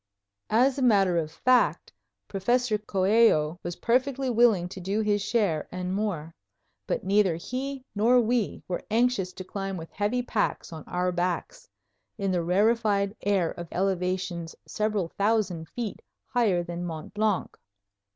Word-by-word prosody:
As 255 +5 +3
a - - -2
matter 200 -7 +4
of 155 -1 -3
fact, 250 +9 +2 0.3
Professor 225 +3 +1
Coello 190 -5 +3
was 175 0 -5
perfectly 260 +2 +1
willing 225 -7 +4
to 190 - -8
do 195 +4 -1
his 205 -1 +1
share 195 -9 0
and 180 0 -3
more; 185 -6 -2 0.5
but - - -1
neither 195 -2 +3
he 260 +8 -5
nor 230 +5 +4
we 235 -2 0
were 180 - -3
anxious 230 -4 +1
to 185 - -7
climb 195 0 -4
with 165 -1 -8
heavy 210 +5 -1
packs 215 -7 -2
on 160 - -8
our 180 0 -1
backs, 180 - -3 0.5
in 195 -2 -1
the 180 -2 +1
rarefied 200 +2 +2
air 195 -4 +1
of 170 - -7
elevations 180 -2 -2
several 210 -5 -1
thousand 195 -6 +1
feet 230 -5 -5 0.2
higher 205 -8 +1
than 175 0 -5
Mont 160 -3 -6
Blanc. 210 -2 0
200 Hz, 145 wpm, -27 LUFS, 180-230 Hz, 0.5 s, matter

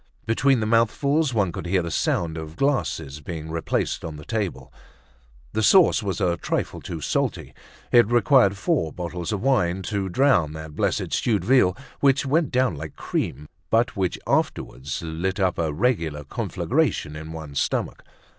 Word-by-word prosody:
Between 125 +2 +2
the - - 0
mouthfuls 135 +7 +2
one 105 -6 +1
could 85 - -6
hear 90 0 +1
the 85 - -4
sound 80 0 0
of 80 -1 -7
glasses 80 - -1
being 80 0 -6
replaced 80 0 -1
on 80 -2 -5
the 75 0 -10
table. 95 -12 -3 0.8
The 110 - 0
sauce 180 - +5
was 100 -1 -3
a 90 -3 +1
trifle - - -3
too 80 -2 -6
salty. - - -2 0.4
It 120 -3 +6
required 120 -4 +4
four 125 - 0
bottles 85 +1 -5
of 105 -1 -2
wine 95 -9 +1
to 100 -1 -2
drown 90 - +3
that 80 -1 -8
blessed - - -1
stewed 110 -4 +1
veal, 125 -8 +4 0.2
which 140 -1 +3
went 150 +2 +2
down 130 -6 +2
like 80 +1 -7
cream, 75 +3 -3 0.2
but 120 +3 +2
which 95 -3 -1
afterwards 70 +6 -1
lit 85 +4 -3
up 95 -3 +1
a 80 -2 0
regular 80 -6 0
conflagration 75 +1 -1
in 80 +1 -7
one's 75 -3 -5
stomach. - - -2
95 Hz, 165 wpm, -24 LUFS, 80-120 Hz, 0.8 s, It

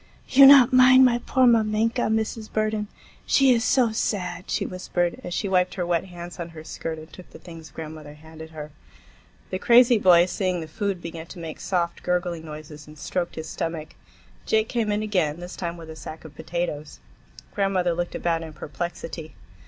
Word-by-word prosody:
"You 270 +1 +8
not 270 -2 +8
mind 255 +1 +7
my 240 -1 +3
poor 260 -1 +3
mamenka, 225 0 +2
Mrs. 220 0 -2
Burden. 215 -1 -1 0.4
She 270 -2 +5
is 230 -1 +1
so 250 -3 +3
sad," 185 -5 -3
she - - -1
whispered, 175 -1 -2
as 175 - -6
she 200 - -2
wiped 185 -1 +1
her 180 -2 -2
wet 170 +1 0
hands 175 -1 -10
on 170 0 -5
her 155 - -8
skirt 160 0 -5
and 155 +1 -12
took 185 - -13
the - - -13
things 165 -2 -12
grandmother 155 -2 -9
handed 160 +1 -12
her. 155 -1 -9 0.8
The 185 - -2
crazy 240 +1 +5
boy, 175 -3 +6
seeing 185 -1 -2
the 160 - -6
food, 195 +1 -3
began 165 -1 -7
to - - -11
make 165 -2 -7
soft, 175 -3 -2
gurgling 175 -2 -2
noises 150 -1 -10
and 150 0 -14
stroked 175 +3 -3
his 160 - -6
stomach. 165 -2 -4 0.6
Jake 220 0 +2
came 225 -3 -1
in 210 +1 -1
again, 175 -7 0
this 175 +1 -8
time 170 -1 -4
with 165 -1 -10
a - - -9
sack 160 0 -10
of 155 - -11
potatoes. 160 -1 -5 0.5
Grandmother 190 -3 +1
looked 175 +1 -3
about 165 -1 -1
in 160 -1 -8
perplexity. 160 +1 -6
175 Hz, 190 wpm, -24 LUFS, 160-215 Hz, 0.8 s, You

